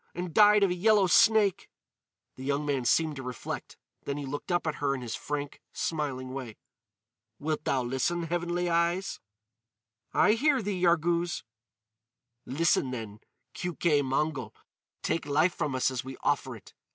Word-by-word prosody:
And 175 -1 -4
died 210 -1 +6
of 195 - +3
a - - +2
yellow 205 +2 +4
snake." 205 0 +4 0.7
The 130 - -9
young 140 +2 -1
man 135 -4 -1
seemed 155 +4 +2
to - - -5
reflect. 125 -2 -6 0.3
Then 140 0 -3
he 145 - -4
looked 145 +6 -5
up 175 -1 +1
at 155 -2 -2
her 140 -1 +1
in 130 - -6
his 115 -3 -5
frank, 145 +3 -4
smiling 135 -5 -3
way. 125 -5 -6 0.8
"Wilt 155 +2 -3
thou 130 -2 +1
listen, 135 +8 -1
Heavenly 175 +1 -1
Eyes?" 170 +3 0 0.9
"I 205 - +4
hear 270 +1 +2
thee, 195 -3 -2
Yarghouz." 170 -1 +2 1.0
"Listen 145 -1 +2
then, 110 -4 -6 0.3
Keuke 170 -4 +1
Mongol. 135 -3 -1 0.5
Take 165 - -1
life 155 +5 +3
from 150 -5 -2
us 130 +1 +1
as 130 -2 -3
we 130 0 -8
offer - - 0
it. - - -15
155 Hz, 155 wpm, -29 LUFS, 135-175 Hz, 1.0 s, died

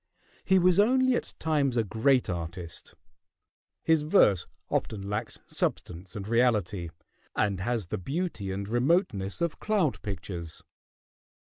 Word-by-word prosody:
He 190 - +4
was 180 +1 +4
only 260 +4 +4
at - - -3
times 145 -5 +1
a 115 - +3
great 120 +5 +2
artist: 85 0 -6 0.9
his 160 -2 +4
verse 125 - +4 0.2
often 100 -2 -2
lacks 105 +1 -3
substance 90 +1 -3
and 100 -1 -5
reality, 105 -7 +1 0.5
and 100 -3 +1
has 115 +1 -1
the 85 - -4
beauty 135 - -3
and 100 +1 -4
remoteness 120 - +1
of 170 -3 -1
cloud 200 -10 +1
pictures. 85 -4 -6
110 Hz, 125 wpm, -28 LUFS, 95-160 Hz, 0.9 s, He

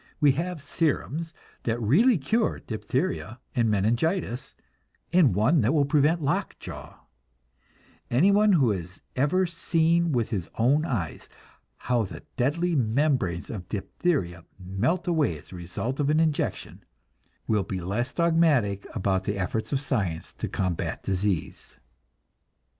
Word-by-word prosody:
We 145 -2 +6
have 165 +2 -3
serums 160 +2 -1 0.3
that 115 0 -1
really 185 - +4
cure 215 - 0
diphtheria 125 +2 -3 0.2
and 115 -2 +2
meningitis, 120 - 0 0.6
and 160 - +5
one 130 - +3
that 120 +8 +2
will 145 -2 +4
prevent 150 +3 +2
lock 140 - -1
jaw; - - -10 1.0
anyone 200 - +4
who 135 -10 +4
has 90 -2 -5 0.2
ever 150 +8 +2
seen 170 0 +1
with 120 -5 0
his 95 -7 -2
own 140 +7 +3
eyes 95 - -3 0.5
how 125 -1 0
the 90 -6 -6
deadly 160 +7 +1
membranes 120 - +1
of 95 -6 -7
diphtheria 95 - -2
melt 105 - -1
away 155 - +1
as - - -16
a - - -8
result 90 - -4
of 145 -1 +1
an 155 +1 +3
injection, 160 -2 -1 0.6
will 105 -2 +2
be 95 0 -4
less 105 +9 -2
dogmatic 160 - +2
about 95 -3 0
the 105 - -1
efforts 100 +4 -2
of 140 - +1
science 105 - -2
to - - -4
combat 90 -3 -2
disease. 95 -2 -2
130 Hz, 135 wpm, -26 LUFS, 100-160 Hz, 1.0 s, We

